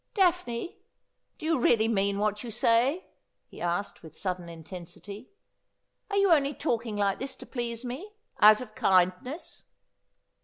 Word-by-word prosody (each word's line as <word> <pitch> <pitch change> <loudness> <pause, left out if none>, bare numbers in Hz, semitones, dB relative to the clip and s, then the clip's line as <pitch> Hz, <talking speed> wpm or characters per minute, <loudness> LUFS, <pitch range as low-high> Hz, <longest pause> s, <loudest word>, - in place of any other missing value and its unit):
' - - -49
Daphne, 355 - +1 0.6
do 315 - -8
you 325 -3 +2
really 225 -2 +4
mean 200 -2 +1
what 210 +1 0
you 240 - -6
say 235 - +2 0.2
?' - - -52
he - - -11
asked 175 +4 -2
with 160 -1 -12
sudden 180 -2 -3
intensity. 175 +6 -9 0.4
' - - -50
Are 400 - -1
you 395 -2 +4
only 285 -3 +3
talking 230 -6 -2
like 200 -1 +1
this 270 +1 -4
to - - -11
please 240 -1 -4
me 305 +13 -6
— - - -35
out 215 +2 +8
of 215 -4 -9
kindness 185 - 0
230 Hz, 165 wpm, -28 LUFS, 195-275 Hz, 0.6 s, out